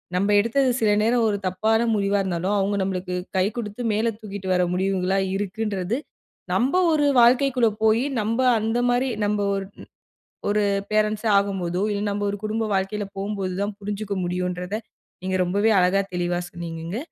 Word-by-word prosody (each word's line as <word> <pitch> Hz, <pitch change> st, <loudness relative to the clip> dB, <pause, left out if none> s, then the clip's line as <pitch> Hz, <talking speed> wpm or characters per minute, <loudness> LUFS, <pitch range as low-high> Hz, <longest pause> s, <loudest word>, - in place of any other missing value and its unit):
நம்ம 195 Hz, +3 st, +1 dB
எடுத்தது 255 Hz, +5 st, +2 dB
சில 220 Hz, -, +2 dB
நேரம் 230 Hz, +2 st, +2 dB
ஒரு 205 Hz, -, 0 dB
தப்பான 220 Hz, +5 st, +1 dB
முடிவா 200 Hz, 0 st, +1 dB
இருந்தாலும், 185 Hz, +1 st, -1 dB
அவங்க 200 Hz, +1 st, 0 dB
நம்மளுக்கு 185 Hz, -1 st, -2 dB, 0.2 s
கை 185 Hz, -, +3 dB
குடுத்து 220 Hz, -1 st, -5 dB
மேல 225 Hz, +2 st, +1 dB
தூக்கிட்டு 200 Hz, -3 st, -7 dB
வர 180 Hz, 0 st, +3 dB
முடிவுகளா 190 Hz, 0 st, 0 dB, 0.2 s
இருக்குன்றது, 205 Hz, +1 st, -2 dB, 0.6 s
நம்ப 260 Hz, +8 st, +2 dB, 0.2 s
ஒரு 295 Hz, -2 st, +3 dB
வாழ்க்கைக்குள்ள 250 Hz, 0 st, +4 dB, 0.2 s
போய் 220 Hz, +2 st, +4 dB, 0.2 s
நம்ப 225 Hz, +4 st, -1 dB, 0.2 s
அந்த 225 Hz, +2 st, -1 dB
மாரி, 250 Hz, +2 st, +1 dB
நம்ம 210 Hz, 0 st, 0 dB, 0.2 s
ஒரு 195 Hz, 0 st, -4 dB, 0.8 s
ஒரு 210 Hz, 0 st, +2 dB, 0.3 s
பேரன்ட்ஸ் 215 Hz, +1 st, +1 dB
ஆகும்போதோ, 190 Hz, -3 st, -1 dB
இல்ல 205 Hz, 0 st, -2 dB
நம்ப 205 Hz, 0 st, -2 dB
ஒரு 205 Hz, -, -3 dB
குடும்ப 220 Hz, +1 st, -1 dB
வாழ்க்கையில 195 Hz, +2 st, -1 dB
போவும்போது 195 Hz, -2 st, -3 dB
தான் 205 Hz, 0 st, -2 dB
புரிஞ்சிக்க 205 Hz, 0 st, -4 dB
முடியும்ன்றத, 180 Hz, +3 st, -2 dB, 0.4 s
நீங்க 185 Hz, 0 st, 0 dB
ரொம்பவே 205 Hz, +5 st, +2 dB
அழகா 185 Hz, +2 st, +3 dB
தெளிவா 175 Hz, 0 st, -1 dB
சொன்னீங்கங்க, 170 Hz, +2 st, -6 dB
205 Hz, 150 wpm, -23 LUFS, 185-220 Hz, 0.8 s, வாழ்க்கைக்குள்ள